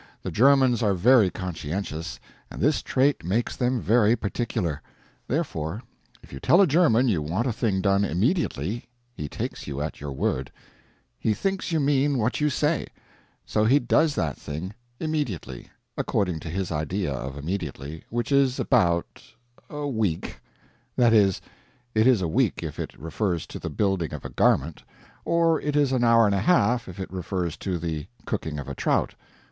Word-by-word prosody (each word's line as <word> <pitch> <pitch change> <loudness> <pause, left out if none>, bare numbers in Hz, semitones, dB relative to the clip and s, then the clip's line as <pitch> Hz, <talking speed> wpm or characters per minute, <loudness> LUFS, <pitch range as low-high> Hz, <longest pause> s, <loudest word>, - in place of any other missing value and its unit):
The - - -3
Germans 130 -1 +4
are 100 -4 +2
very 110 +2 +5
conscientious, 85 -2 -5 0.3
and - - -9
this 150 +1 +2
trait 135 -2 +1
makes 105 +8 -1
them 125 0 0
very 115 0 +3
particular. 95 - -2 0.5
Therefore 110 - -2 0.4
if - - -15
you 65 - -6
tell 160 - +4
a 200 - +7
German 145 -7 +4
you 95 -9 +1
want 90 +10 -1
a 125 - 0
thing 105 -4 0
done 100 0 +3
immediately, 105 - -1 0.3
he 75 -10 -6
takes - - -5
you 70 -1 -4
at 75 0 -4
your 75 -1 -5
word; 65 0 -2 0.7
he 110 - +1
thinks 195 - -2
you 160 - +2
mean 140 -1 +2
what 120 +5 0
you 150 - +3
say; 150 +2 0 0.6
so 105 - +1
he 125 +6 +5
does 145 +4 +2
that 80 -4 -1
thing 80 +7 -6 0.3
immediately 150 - -3 0.3
according 90 -5 -1
to 80 - -7
his 95 +2 -3
idea 80 +2 -2
of 65 +2 -5
immediately 75 -2 -5
which 120 +3 -2
is 135 -2 +3
about 85 -10 +1 0.5
a 150 0 -5
week; 110 - -2 0.6
that 120 -2 +4
is, 100 -4 +4 0.5
it 110 +2 +4
is 120 -8 +4
a - - +1
week 80 - +1
if - - -6
it - - -5
refers 85 +3 -2
to - - -8
the - - -4
building 95 -6 -1
of - - -9
a - - -4
garment, 75 +3 +2 0.4
or 165 -1 +2
it 150 -1 -2
is 145 -2 +3
an 130 -2 +1
hour 115 -1 +6
and 100 - +2
a 100 - +1
half 125 - +3
if 90 +1 -9
it 95 -1 -6
refers 90 -2 -3
to 95 -3 -3
the 80 -3 -4 0.2
cooking 75 -2 -3
of 70 - -6
a - - -4
trout. - - 0
105 Hz, 175 wpm, -25 LUFS, 85-130 Hz, 0.7 s, a